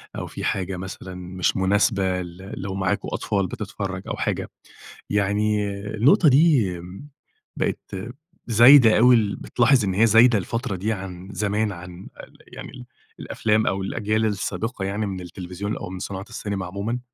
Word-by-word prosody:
أو - - -5
فيه - - -8
حاجة 95 0 -2
مثلًا 95 0 -8
مش 90 0 -2
مناسبة 95 -1 +1
ل 90 +2 -9
لو 95 0 -4
معاكم 95 +1 -1
أطفال 100 -3 -1
بتتفرج 100 -2 -5
أو - - -3
حاجة، - - -2 0.6
يعني 105 +1 +1 0.3
النقطة 150 - +5
دي، 140 - +4 0.9
بقت - - -3 0.5
زايدة 120 +1 +7
أوي، 115 -4 +4
بتلاحظ 125 0 +3
إن 95 - -1
هي 105 +5 +4
زايدة 115 +1 +6
الفترة 105 +1 -3
دي 105 +5 -1
عن 95 -2 -8
زمان 105 +1 0
عن 90 0 -10 0.4
يعني - - -9
ال 125 -2 -11 0.3
الأفلام 110 0 0
أو 95 0 0
الأجيال 110 +2 -1
السابقة 105 +1 -3
يعني 100 +2 -2
من 95 -2 -5
التلفزيون 90 +3 -6
أو - - -7
من 95 0 -7
صناعة 95 0 -5
السينما 100 -3 -4
عمومًا، 100 +7 -3
100 Hz, 145 wpm, -23 LUFS, 95-110 Hz, 0.9 s, زايدة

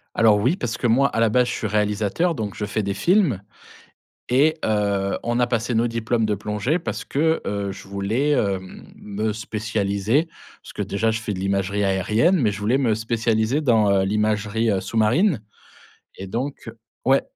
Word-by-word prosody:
Alors, 110 -2 +5
oui, 125 - +2
parce 120 -7 -3
que 120 - 0
moi, 135 +5 +4
à - - -2
la 115 -1 +4
base, 125 +2 +3
je - - -2
suis 110 - -3
réalisateur 105 - 0
donc 105 -4 -4
je 105 - -3
fais 105 +1 -2
des 100 0 -1
films 170 - +2 0.9
et 150 +6 +3
heu, 100 -2 0
on 120 +1 0
a 120 - +3
passé 120 0 -1
nos 115 +2 +2
diplômes 115 0 -1
de 105 -1 0
plongée 105 - -1
parce - - -5
que, 160 +3 +1
heu, 100 -1 -2
je 95 - -11
voulais, 105 +9 -1
hem, 95 -7 -2
me 105 +1 -3
spécialiser 110 - -1 0.4
parce - - -12
que, - - -4
déjà, 110 +3 0
je 110 0 -3
fais 105 -2 -3
de 90 - -5
l'imagerie 100 +1 0
aérienne, 105 - +2
mais 110 -4 +2
je 100 - -6
voulais 115 +6 +1
me 115 -5 +2
spécialiser 115 +4 0
dans 110 -7 +3
heu, 95 -1 +3
l'imagerie, 105 +2 0
heu, 95 -1 0
sous-marine 120 - +2 0.8
et 95 - -7
donc 120 +4 -4 0.4
ouais 135 +1 +4
110 Hz, 185 wpm, -22 LUFS, 100-120 Hz, 0.9 s, Alors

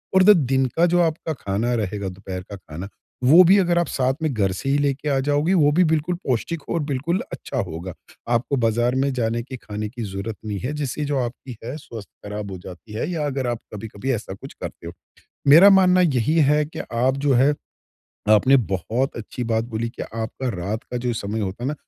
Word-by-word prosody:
और 190 - +7
द 200 - +6 0.2
दिन 135 0 +3
का 170 - +5
जो 175 0 +3
आपका 160 -1 -1
खाना 110 -1 -2
रहेगा, 100 -2 -2
दोपहर 95 0 -7
का - - -5
खाना 90 0 -8 0.3
वो 160 +8 +8
भी 190 +4 +6
अगर 175 -2 +2
आप 175 - 0
साथ 130 0 +1
में 155 -3 0
घर 100 -4 +1
से 95 +8 -4
ही 140 - +3
लेके 145 0 0
आ 135 -1 +2
जाओगे 145 +5 +2
वो 150 -4 +4
भी 175 +5 +4
बिल्कुल 160 +3 0
पौष्टिक 130 +6 -1
हो - - -1
और 170 - +1
बिल्कुल 145 +6 -1
अच्छा - - -6
होगा। 90 +1 -6 0.4
आपको 120 +4 +1
बाज़ार 120 +1 +1
में 135 +1 +1
जाने 115 -2 -1
की, 130 +1 -8
खाने 105 -2 -5
की 120 +1 -6
ज़रूरत 100 +2 -5
नहीं 105 -2 -3
है 125 +7 -3
जिससे 150 0 -3
जो 145 -1 -1
आपकी 125 0 -5
है 125 +5 -5
स्वास्थ्य 110 -7 -11
ख़राब 105 -1 -5
हो 95 - -5
जाती 95 +4 -11
है 110 +9 -2
या 160 -4 -1
अगर 135 -3 -2
आप 120 -2 -2
कभी-कभी 105 +4 -4
ऐसा 110 -4 -4
कुछ 95 - -11
करते 85 - -7
हो। 85 - -7 0.6
मेरा 170 +8 +9
मानना 185 -1 +5
यही 150 -3 +2
है 150 0 +4
कि 155 - -8
आप 125 +3 +2
जो 140 - +4
है 135 +4 +4 0.8
आपने 130 +6 +6
बहुत 110 +8 -1
अच्छी 115 +2 -6
बात 110 0 +1
बोली 115 -1 -3
कि 115 - -8
आपका 115 +3 -4
रात 100 +5 -3
का 125 - -6
जो 120 0 -1
समय 110 0 -3
होता 100 +3 -4
है 135 - 0
न - - -3
125 Hz, 220 wpm, -22 LUFS, 105-145 Hz, 0.8 s, मेरा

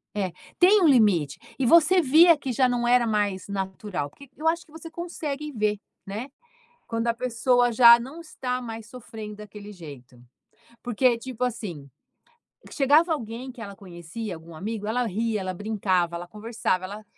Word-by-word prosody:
é. 190 -4 -2 0.2
Tem 385 +3 +6
um 335 - +5
limite. 205 - +3 0.2
E 265 - 0
você 340 +6 +6
via 325 +3 +6
que 270 -2 -4
já 255 +2 +3
não 240 -1 0
era 245 0 +4
mais 205 -3 -1
natural. 190 -5 -4
Porque 280 - -16
eu 315 - -3
acho 335 +1 +1
que - - -24
você 320 +1 -10
consegue 305 -3 -5
ver, 210 -4 -1 0.3
né. 215 +7 -6 0.6
Quando 230 0 -2
a 230 - +2
pessoa 245 0 +1
já 235 0 +8
não 265 +8 -8
está 255 -6 -4
mais 225 -2 -7
sofrendo 220 -3 -9
daquele 210 0 -10
jeito. 140 -9 -12 0.6
Porque, 245 0 +2
tipo 250 0 -8
assim, 175 - -5 0.8
que - - -12
chegava 300 +4 +4
alguém 240 -1 -6
que 245 -2 -10
ela 200 -1 -8
conhecia 185 +2 -8
algum 165 +1 -12
amigo, 210 +5 -5
ela 240 +2 0
ria, 220 +1 -1
ela 185 0 -4
brincava, 185 -4 -1
ela 175 +1 -7
conversava, 215 -3 -2
ela 205 +3 -8
230 Hz, 170 wpm, -25 LUFS, 200-260 Hz, 0.8 s, já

